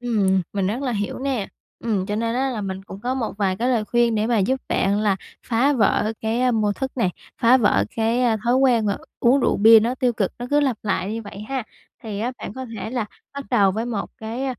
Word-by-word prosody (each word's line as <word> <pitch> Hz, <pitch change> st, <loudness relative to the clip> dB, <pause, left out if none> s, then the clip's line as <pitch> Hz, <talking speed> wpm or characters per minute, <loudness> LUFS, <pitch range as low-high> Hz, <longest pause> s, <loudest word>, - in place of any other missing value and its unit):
Ừm, 200 Hz, -6 st, +1 dB
mình 195 Hz, -2 st, 0 dB
rất 230 Hz, +7 st, -2 dB
là 255 Hz, -3 st, -1 dB
hiểu 205 Hz, -1 st, -3 dB
nè. 260 Hz, -7 st, -2 dB, 0.4 s
Ừm, 200 Hz, -5 st, 0 dB
cho 205 Hz, 0 st, -2 dB
nên 230 Hz, +1 st, -1 dB
á 265 Hz, +1 st, 0 dB
là 230 Hz, -4 st, -3 dB
mình 190 Hz, -1 st, -5 dB
cũng 195 Hz, 0 st, -10 dB
có 250 Hz, +4 st, -1 dB
một 245 Hz, -4 st, -2 dB
vài 190 Hz, -2 st, +1 dB
cái 245 Hz, +4 st, 0 dB
lời 230 Hz, -4 st, +1 dB
khuyên 240 Hz, 0 st, +2 dB
để 215 Hz, 0 st, +1 dB
mà 235 Hz, -1 st, +2 dB
giúp 255 Hz, +7 st, +1 dB
bạn 200 Hz, +2 st, +1 dB
là 205 Hz, -3 st, +2 dB, 0.3 s
phá 250 Hz, +5 st, +2 dB
vỡ 215 Hz, -2 st, +2 dB
cái 240 Hz, +3 st, +1 dB
mô 215 Hz, -2 st, +1 dB
thức 265 Hz, +5 st, -5 dB
này, 205 Hz, -8 st, +1 dB, 0.3 s
phá 240 Hz, +3 st, +7 dB
vỡ 205 Hz, -, +3 dB
cái 230 Hz, +3 st, +1 dB, 0.2 s
thói 240 Hz, +1 st, +3 dB
quen 245 Hz, -5 st, +3 dB
mà 200 Hz, -, 0 dB, 0.2 s
uống 255 Hz, +4 st, +4 dB
rượu -, -, +2 dB
bia 220 Hz, +2 st, +8 dB
nó 235 Hz, +3 st, 0 dB
tiêu 255 Hz, -2 st, +1 dB
cực, 200 Hz, -4 st, -1 dB
nó 245 Hz, -, -5 dB
cứ 290 Hz, 0 st, +4 dB
lặp 265 Hz, -5 st, +1 dB
lại 200 Hz, -1 st, -1 dB
như 230 Hz, -, -4 dB
vậy 200 Hz, -1 st, -9 dB
ha. 265 Hz, -2 st, -2 dB, 0.4 s
Thì 215 Hz, -4 st, -5 dB
á 240 Hz, +3 st, -1 dB
bạn -, -, -6 dB
có 260 Hz, +2 st, -6 dB
thể 220 Hz, -, -5 dB
là 245 Hz, -3 st, -1 dB, 0.3 s
bắt 280 Hz, -, -5 dB
đầu 205 Hz, -6 st, +4 dB
với 225 Hz, +3 st, -2 dB
một 220 Hz, -5 st, -3 dB
cái 225 Hz, +4 st, -4 dB
225 Hz, 245 wpm, -22 LUFS, 205-250 Hz, 0.4 s, bia